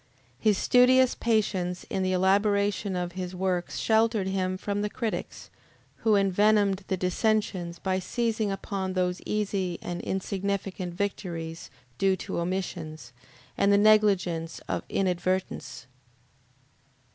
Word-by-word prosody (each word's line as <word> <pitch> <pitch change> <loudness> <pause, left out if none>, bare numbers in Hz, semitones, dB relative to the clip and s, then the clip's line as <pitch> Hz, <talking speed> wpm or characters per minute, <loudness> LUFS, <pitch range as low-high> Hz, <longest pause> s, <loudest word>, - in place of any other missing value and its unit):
His 210 -3 +3
studious 250 +2 +5
patience 195 -6 0
in 190 - -2
the 185 0 +1
elaboration 200 +1 +2
of 175 -1 -2
his 185 0 -5
works 180 -1 -1
sheltered 220 -2 +2
him 185 -1 -1
from 205 +1 -2
the 210 - -1
critics, 225 0 -4 0.5
who 220 -2 +3
envenomed 200 0 +3
the 190 - -1
dissensions 180 -2 0
by 185 +1 -1
seizing 220 +1 -1
upon 195 -1 -3
those 180 -1 -1
easy 195 -4 -1
and 175 0 -5
insignificant 190 -1 -3
victories 170 -4 -4 0.3
due 195 -1 +3
to 180 - -4
omissions, 170 -7 -4 0.4
and 200 - +3
the 200 - +6
negligence 195 -6 +3
of - - -1
inadvertence. 185 -5 -1
190 Hz, 120 wpm, -27 LUFS, 180-205 Hz, 0.5 s, the